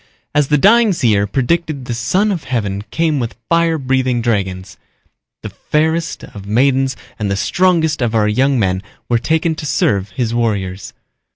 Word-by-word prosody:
As 145 Hz, -2 st, +2 dB
the 150 Hz, -, +3 dB
dying 220 Hz, +5 st, +5 dB
seer 110 Hz, -, +2 dB
predicted 140 Hz, -, -1 dB
the 120 Hz, -, -3 dB
Son 180 Hz, -, +1 dB
of 175 Hz, -6 st, -4 dB
Heaven 105 Hz, -6 st, -2 dB
came 160 Hz, -1 st, 0 dB
with 120 Hz, -2 st, -4 dB
fire 170 Hz, -1 st, +2 dB
breathing 130 Hz, -3 st, 0 dB
dragons. 95 Hz, -5 st, -2 dB, 0.7 s
The -, -, -5 dB
fairest 160 Hz, +2 st, -1 dB
of 100 Hz, -1 st, -10 dB
maidens 130 Hz, +3 st, +2 dB, 0.2 s
and 105 Hz, -2 st, -1 dB
the 100 Hz, -, 0 dB
strongest 165 Hz, -, +1 dB
of 120 Hz, -2 st, 0 dB
our 105 Hz, -1 st, +3 dB
young 130 Hz, +6 st, +2 dB
men 95 Hz, -4 st, 0 dB, 0.3 s
were 120 Hz, -1 st, +2 dB
taken 160 Hz, +5 st, 0 dB
to 155 Hz, -, -7 dB
serve 100 Hz, -8 st, +1 dB
his 115 Hz, +3 st, -2 dB
warriors. 100 Hz, -5 st, -2 dB
130 Hz, 165 wpm, -17 LUFS, 105-160 Hz, 0.7 s, dying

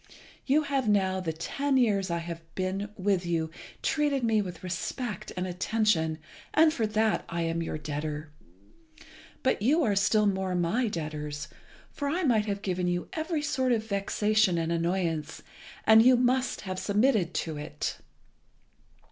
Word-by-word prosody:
You 295 Hz, +3 st, +4 dB
have 275 Hz, -5 st, 0 dB
now 190 Hz, -2 st, +2 dB
for -, -, -10 dB
the 160 Hz, -, -1 dB
ten 275 Hz, -, 0 dB
years 205 Hz, -6 st, +2 dB
I 170 Hz, -, 0 dB
have 170 Hz, 0 st, -6 dB
been 190 Hz, +2 st, -2 dB
with 190 Hz, -2 st, +1 dB
you 165 Hz, -2 st, -1 dB, 0.3 s
treated 290 Hz, -4 st, +1 dB
me 220 Hz, -2 st, +3 dB
with 180 Hz, -4 st, -7 dB
respect 190 Hz, +4 st, -4 dB
and 180 Hz, -, -1 dB
attention, 180 Hz, -3 st, +1 dB, 0.4 s
and 310 Hz, 0 st, +6 dB
for 225 Hz, -6 st, 0 dB
that 215 Hz, +1 st, +1 dB
I 170 Hz, 0 st, -2 dB
am 165 Hz, 0 st, -1 dB
your 160 Hz, -, -3 dB
debtor. 150 Hz, 0 st, -4 dB, 1.1 s
But 260 Hz, -, +1 dB
you 300 Hz, +9 st, +3 dB
are 210 Hz, -6 st, +2 dB
still 210 Hz, +2 st, +3 dB
more 190 Hz, -2 st, 0 dB
my 180 Hz, +8 st, +1 dB
debtors, 150 Hz, -5 st, -4 dB, 0.4 s
for 285 Hz, -1 st, -3 dB
I 350 Hz, +5 st, 0 dB
might 220 Hz, -7 st, +2 dB
have 200 Hz, 0 st, -3 dB
given 180 Hz, -2 st, -1 dB
you 175 Hz, 0 st, -1 dB
every 315 Hz, -1 st, -2 dB
sort 260 Hz, -3 st, 0 dB
of 220 Hz, -2 st, +1 dB
vexation 205 Hz, -2 st, +1 dB
and 165 Hz, 0 st, -1 dB
annoyance, 170 Hz, -2 st, -1 dB, 0.4 s
and 220 Hz, +1 st, +8 dB
you 250 Hz, +2 st, +6 dB
must 250 Hz, +1 st, +1 dB
have 185 Hz, -2 st, -4 dB
submitted 210 Hz, -4 st, +2 dB
to 160 Hz, -2 st, -2 dB
it. 145 Hz, -, -4 dB
195 Hz, 160 wpm, -28 LUFS, 170-235 Hz, 1.1 s, and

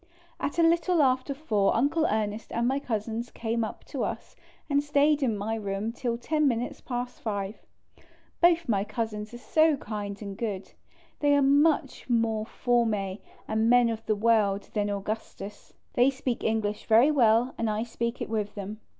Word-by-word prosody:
At 285 Hz, -, -3 dB
a 335 Hz, -, +4 dB
little 335 Hz, +1 st, +3 dB
after 260 Hz, +1 st, +1 dB
4 215 Hz, -10 st, +1 dB
Uncle 290 Hz, +7 st, +2 dB
Ernest 215 Hz, 0 st, -2 dB
and 235 Hz, +1 st, 0 dB
my 270 Hz, +2 st, +1 dB
Cousins 230 Hz, -2 st, -3 dB
came 230 Hz, 0 st, -2 dB
up 220 Hz, -, -6 dB
to -, -, -4 dB
us -, -, -5 dB, 0.3 s
and 285 Hz, -1 st, +2 dB
stayed 295 Hz, +1 st, +3 dB
in 230 Hz, -6 st, +1 dB
my 210 Hz, +2 st, -2 dB
room 205 Hz, 0 st, -2 dB
till 235 Hz, 0 st, -2 dB
10 300 Hz, +5 st, +1 dB
minutes 250 Hz, +3 st, -2 dB
past 245 Hz, -1 st, -5 dB
5. 205 Hz, -1 st, -3 dB, 0.8 s
Both 345 Hz, -1 st, +4 dB
my 200 Hz, -3 st, +1 dB
Cousins 215 Hz, 0 st, -4 dB
are 240 Hz, -, -8 dB
so 310 Hz, +4 st, +3 dB
kind 205 Hz, -4 st, -5 dB
and 200 Hz, -2 st, -6 dB
good; 200 Hz, -3 st, -4 dB, 0.5 s
they 290 Hz, -1 st, +4 dB
are 285 Hz, -, +4 dB
much 285 Hz, -1 st, +2 dB
more 225 Hz, -2 st, +1 dB
Jonnes 220 Hz, -7 st, 0 dB, 0.3 s
and 220 Hz, +1 st, +1 dB
men 245 Hz, -1 st, +5 dB
of 225 Hz, -1 st, -4 dB
the 215 Hz, -, +2 dB
world 210 Hz, -2 st, +2 dB
than 205 Hz, -1 st, 0 dB
Augustus; 205 Hz, 0 st, -6 dB, 0.2 s
they 245 Hz, +2 st, +4 dB
speak 260 Hz, -3 st, -3 dB
English 215 Hz, -2 st, -1 dB
very 235 Hz, +7 st, +6 dB
well, 240 Hz, -2 st, +3 dB
and 230 Hz, -, 0 dB
1 215 Hz, +1 st, -1 dB
speak 235 Hz, +1 st, -3 dB
it -, -, -5 dB
with 210 Hz, -2 st, -3 dB
them. 205 Hz, +1 st, -6 dB
230 Hz, 175 wpm, -27 LUFS, 210-270 Hz, 0.8 s, very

